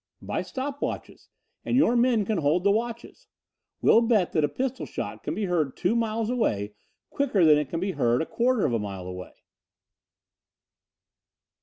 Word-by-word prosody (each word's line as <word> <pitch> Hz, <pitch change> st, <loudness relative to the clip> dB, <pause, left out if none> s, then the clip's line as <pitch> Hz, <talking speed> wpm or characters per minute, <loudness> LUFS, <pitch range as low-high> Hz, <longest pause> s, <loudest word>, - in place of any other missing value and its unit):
"By -, -, -3 dB
stop 275 Hz, +2 st, -5 dB
watches, -, -, -5 dB, 0.3 s
and 245 Hz, -, 0 dB
your 255 Hz, -3 st, +4 dB
men 235 Hz, -3 st, +3 dB
can 210 Hz, -2 st, 0 dB
hold 155 Hz, +4 st, +1 dB
the 200 Hz, -, +4 dB
watches. 235 Hz, -, -4 dB, 0.6 s
We'll 230 Hz, -, +6 dB
bet 225 Hz, -6 st, +2 dB
that 155 Hz, -, +1 dB
a 150 Hz, -, +2 dB
pistol 260 Hz, -, -3 dB
shot -, -, -6 dB
can -, -, -4 dB
be 210 Hz, -, -1 dB
heard 160 Hz, -7 st, -1 dB
two 185 Hz, +6 st, +1 dB
miles 225 Hz, -1 st, 0 dB
away 105 Hz, -, -1 dB, 0.4 s
quicker 250 Hz, -11 st, +2 dB
than 150 Hz, -1 st, +6 dB
it 150 Hz, -3 st, -3 dB
can 165 Hz, -, -3 dB
be 190 Hz, +2 st, -1 dB
heard 120 Hz, -7 st, +1 dB
a -, -, -1 dB
quarter 245 Hz, +2 st, +1 dB
of 125 Hz, -, 0 dB
a 115 Hz, -, +1 dB
mile 100 Hz, -3 st, -6 dB
away." 90 Hz, 0 st, -8 dB
200 Hz, 175 wpm, -26 LUFS, 150-235 Hz, 0.6 s, We'll